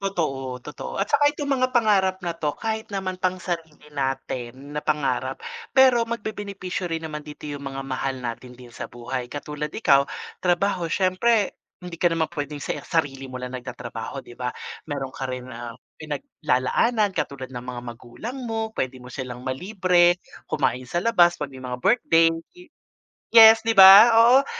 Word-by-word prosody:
Totoo, 135 -10 -2
totoo, 150 - -7
at 195 - +2
tsaka 290 0 +4
itong 285 -1 -2
mga 255 0 +2
pangarap 200 -5 +3
na 170 - 0
'to 150 -3 -3
kahit 220 -1 -3
naman 185 -2 -3
pang 185 0 0
sarili 160 -4 -5
natin, 135 0 -4
na 150 - -1
pangarap, 150 -2 -1 0.4
pero 260 -3 +6
mag-bebenepisyo 200 -5 -4
rin 165 0 -3
naman 150 -1 -6
dito 150 0 -11
yung 145 -1 -6
mga 135 0 -5
mahal 135 0 -2
natin 120 +1 -6
din 125 -2 -14
sa - - -6
buhay, 120 +1 -5
katulad 150 +1 -5
Ikaw, 140 -10 +4 0.4
trabaho. 180 -1 +1
Siyempre, 195 +3 +2 0.3
hindi 175 -2 -8
ka 175 - +2
naman 165 -1 0
pwedeng 145 -1 -5
se - - -3
sarili 135 -4 -1
mo 130 -1 -8
lang 125 - -5
nag-tatrabaho 125 +1 -7
'di 120 - -15
ba? 125 -1 -2 0.4
Meron 140 -3 -4
ka 135 - -4
rin 125 0 -6
na 115 -1 -7 0.2
pinaglalaanan 155 - 0
katulad 130 -5 -4
ng 125 -2 -7
mga 125 -1 -6
magulang 120 - -8
mo, 225 -1 -3
pwede 130 0 -3
mo 125 - -13
silang 125 -1 -6
ma-libre, 180 +4 +2 0.3
kumain 130 -3 0
sa 175 - -2
labas 175 -7 +4
'pag 145 -2 -4
may 130 -1 -11
mga 125 -1 -5
birthday, 165 -9 +4 0.2
ye 360 0 -16 0.7
yes, 220 0 +9
'di 225 - +2
ba? 195 +4 +10
Oo, 240 +4 +6
155 Hz, 170 wpm, -24 LUFS, 130-195 Hz, 0.7 s, ba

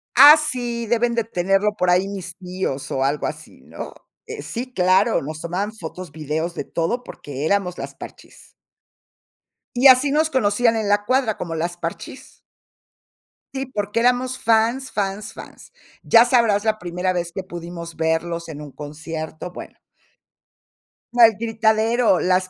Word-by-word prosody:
Ah, 290 +4 +10
sí, 245 -6 -2
deben 235 +1 +1
de 230 - +1
tenerlo 195 +1 0
por 180 -2 +1
ahí 180 +2 +3
mis 185 -3 -7
tíos, 180 -7 -4
o 135 - 0
algo 140 +1 0
así, - - -7
¿no? - - -9 0.3
Eh, 145 - -7
sí, 245 - -5
claro, 190 +3 +3
nos 155 +2 -6
tomaban 190 +6 -3
fotos, 180 -4 -8
videos, 155 +2 -3
de - - -5
todo, 235 +10 -2
porque 145 - -7
éramos 185 -1 0
las - - -7
Parchís. - - -13 1.2
Y 255 +3 +6
así 265 +2 +6
nos 310 +2 +2
conocían 230 -2 +2
en 220 -2 -1
la 205 0 +2
cuadra, 255 -2 +1
como 165 -2 -5
las 175 +2 -3
Parchís. - - -8 1.1
Sí, 265 -1 -3
porque 210 -2 -2
éramos 250 +1 +1
fans, 230 +4 +1
fans, 200 0 -3
fans. - - -12 0.3
Ya 230 +1 +6
sabrás 230 -4 +2
la 215 -1 +1
primera 180 +1 -2
vez 175 -1 -3
que 190 +2 -5
pudimos 170 -2 -8
verlos 165 +1 -1
en 150 -1 -7
un 145 -2 -9
concierto, 160 +3 -7
bueno. - - -10 1.4
El 225 -3 +6
gritadero, 225 -1 +2
las 185 0 +1
200 Hz, 150 wpm, -21 LUFS, 170-235 Hz, 1.4 s, Ah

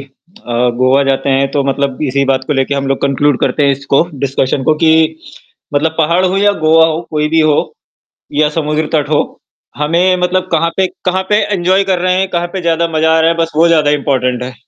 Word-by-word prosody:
अ, 140 - -13 0.3
गोवा 130 +2 +3
जाते 135 0 -1
हैं 135 0 +1
तो 140 0 0
मतलब 140 0 -2
इसी 140 0 0
बात 130 -1 0
को 150 - 0
लेके 135 +1 -1
हम 140 0 -2
लोग 135 0 -1
कन्क्लूड 140 0 +1
करते 145 - 0
हैं - - +3
इसको 140 +1 +1
डिस्कशन 135 0 -1
को 155 - +3
कि 160 - +5 0.8
मतलब 160 +2 0
पहाड़ 170 +4 +2
हो 185 +1 0
या 205 +1 +3
गोवा 160 +1 +4
हो 160 0 -2
कोई 150 -1 -1
भी 160 0 +2
हो 155 -1 +3 0.8
या 150 +1 +2
समुद्र 150 0 -2
तट 150 -3 0
हो, 150 - +2 0.6
हमें 170 +5 +1
मतलब 185 +1 0
कहाँ 165 +1 +1
पे 190 -1 +2 0.2
कहाँ 185 +1 0
पे 210 - +4 0.2
एन्जॉय 185 +2 +1
कर 190 -2 0
रहे 185 0 +1
हैं, 190 - -1
कहाँ 175 0 -1
पे 190 - -4
ज़्यादा 170 0 0
मज़ा 160 0 +1
आ - - +2
रहा 165 +1 +3
है, 165 - -1
बस 165 0 -2
वो 165 +2 +4
ज़्यादा 155 -3 +3
इम्पोर्टेंट 130 -4 -1
है। 125 0 -6
155 Hz, 220 wpm, -13 LUFS, 140-170 Hz, 0.8 s, कि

